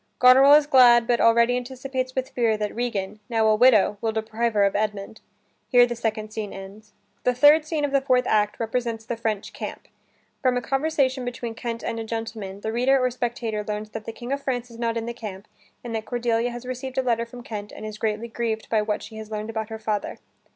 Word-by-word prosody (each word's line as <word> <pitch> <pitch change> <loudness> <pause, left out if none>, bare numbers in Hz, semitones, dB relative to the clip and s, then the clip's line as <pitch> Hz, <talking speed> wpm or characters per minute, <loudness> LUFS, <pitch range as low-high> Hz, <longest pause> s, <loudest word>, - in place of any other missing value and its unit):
Goneril 265 +3 +8
is 300 -1 +5
glad 245 -4 +6
but 240 0 +1
already 235 +1 +4
anticipates 255 +1 -4
with 260 0 -2
fear 230 -3 +1
that 210 -1 -3
Regan, 210 -4 -3
now 225 -2 +2
a 215 0 +5
widow, 215 -4 +4
will 225 - 0
deprive 220 +1 -2
her 205 - +4
of 200 - +2
Edmund. 210 0 -3 0.5
Here 245 -2 +7
the 240 0 -4
second 215 -2 -3
scene 215 -2 -4
ends. 200 +2 -11 0.3
The 250 - +2
third 295 +4 +6
scene 310 -2 -1
of 285 - -3
the 275 -1 +3
fourth 255 -2 +2
act 210 -1 +1
represents 230 -1 -2
the 235 - -3
French 220 -3 -3
camp. - - -7 0.5
From 255 -1 +2
a - - +2
conversation 270 0 0
between 245 -1 -5
Kent 230 0 -5
and 230 - -3
a - - -3
gentleman, 220 -3 -5
the 220 - -3
reader 260 +3 +3
or 255 0 +1
spectator 235 -3 -3
learns 210 0 -5
that 220 -1 -7
the - - -4
King 240 +3 -8
of 280 - -3
France 245 -3 -3
is 230 - -12
not 230 -1 -1
in 225 - -3
the 235 - -4
camp 210 -4 -8 0.4
and 235 -2 -6
that 220 -1 -3
Cordelia 240 -1 0
has 240 +1 -8
received 255 +1 -6
a 265 - +2
letter 235 -2 0
from 245 +1 -11
Kent 210 -3 -6
and - - -9
is 215 0 -7
greatly 220 +1 -2
grieved 225 -1 -3
by 220 -2 +3
what 210 0 -2
she 220 - -10
has 220 -1 -8
learned 215 +1 -4
about 220 -1 -4
her 220 - -5
father. 215 -1 -3
230 Hz, 230 wpm, -24 LUFS, 215-250 Hz, 0.5 s, Goneril